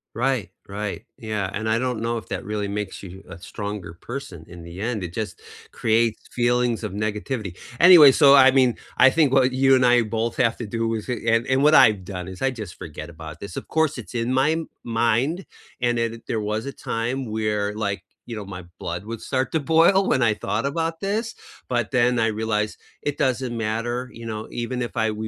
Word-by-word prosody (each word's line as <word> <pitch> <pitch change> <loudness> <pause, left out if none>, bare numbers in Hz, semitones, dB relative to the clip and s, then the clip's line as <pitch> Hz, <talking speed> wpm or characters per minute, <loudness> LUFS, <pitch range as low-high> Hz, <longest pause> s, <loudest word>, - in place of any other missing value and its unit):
Right, 125 -3 0 0.2
right, 100 +1 -4
yeah. 105 -4 -3
And 110 +2 -3
I 110 - +2
don't 125 -1 -1
know 115 +1 -1
if 105 -5 -9
that - - -4
really 105 -1 -3
makes 100 -1 -5
you 95 0 -10
a - - -9
stronger 100 -1 -6
person 90 - -8
in 85 -1 -11
the 85 +2 -10
end, 110 -1 -2
it 85 -1 -6
just 110 -4 -5 0.3
creates 115 0 +1
feelings 120 -1 +1
of 100 - -5
negativity. 105 -1 -3 0.2
Anyway, 170 -6 +9
so 140 +1 +7
I 135 -1 +8
mean, 130 -3 +3 0.2
I 135 - +7
think 145 -1 +2
what 130 -1 +4
you 135 +1 +4
and 130 -1 +3
I 120 -1 +5
both 115 +1 -2
have 115 -1 +2
to 120 - -5
do, 115 +2 -2
is 110 +2 -5
and 115 -1 +1
and 130 +1 +2
what 150 +1 +6
I've 105 -8 +5
done 90 -1 -6
is 95 - -10
I 135 - +2
just 110 -8 -7
forget 75 0 -8
about 80 -1 -10
this, 100 -3 -7
of - - -6
course, 160 -2 +1
it's 120 0 -9
in 120 +1 -1
my 155 +5 +2 0.2
mind, 120 - 0 0.4
and 120 -1 +1
then 115 0 -2
there 110 - 0
was 105 +2 -2
a 140 - -4
time 125 +1 -3
where, 105 -1 -1
like, 100 -2 -2 0.2
you 115 -2 -6
know, 105 - -6
my 90 -2 -8 0.2
blood 85 +2 -4
would 115 +1 -6
start 130 -1 -1
to 160 - +1
boil 165 +6 +4
when 130 - +2
I 110 -2 +3
thought 105 +3 -2
about 165 +3 -2
this, 215 +3 -2 0.3
but 120 -3 -1
then, 125 -1 +3
I 115 - +3
realized 110 -1 -1 0.2
it 145 0 -3
doesn't 130 -1 0
matter, 115 +3 -2
you 115 0 -10
know, 110 -1 -5
even 125 +1 -4
if 120 - -4
I 110 0 +1
we 110 +1 -5
115 Hz, 215 wpm, -23 LUFS, 105-130 Hz, 0.4 s, Anyway